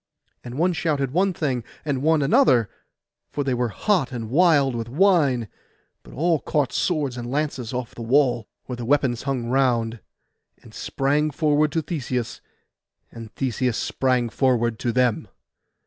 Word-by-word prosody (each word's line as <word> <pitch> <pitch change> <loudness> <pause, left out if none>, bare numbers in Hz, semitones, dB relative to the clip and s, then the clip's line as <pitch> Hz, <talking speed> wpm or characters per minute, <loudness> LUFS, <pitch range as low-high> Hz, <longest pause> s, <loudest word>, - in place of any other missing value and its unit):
And 120 +1 -8
one 175 +3 +2
shouted 145 -6 -1
one 190 +6 +2
thing, 135 -8 -2 0.2
and 140 -4 -1
one 155 0 +3
another; 125 -6 +4 0.6
for 145 - -3
they 135 -2 0
were 120 -1 0
hot 165 - 0
and 115 -3 -5
wild 145 -4 +4
with 115 0 -4
wine: 145 - +3 0.5
but - - -15
all 165 +2 +1
caught 145 -2 -1
swords 145 -8 -1
and 120 0 -5
lances 135 -4 -2
off 125 -2 -4
the - - -9
wall, 125 -2 +2 0.2
where 125 - -6
the 120 - -6
weapons 125 -2 +1
hung 135 -4 -2
around, 120 -3 +1 0.6
and - - -15
sprang 145 +3 0
forward 150 0 +1
to 160 - 0
Theseus, 125 -7 -4 0.7
and 115 -2 -10
Theseus 125 -2 -1
sprang 125 -3 0
forward 120 -3 +1
to 120 - -1
them. 125 -2 +1
130 Hz, 155 wpm, -23 LUFS, 120-150 Hz, 0.7 s, another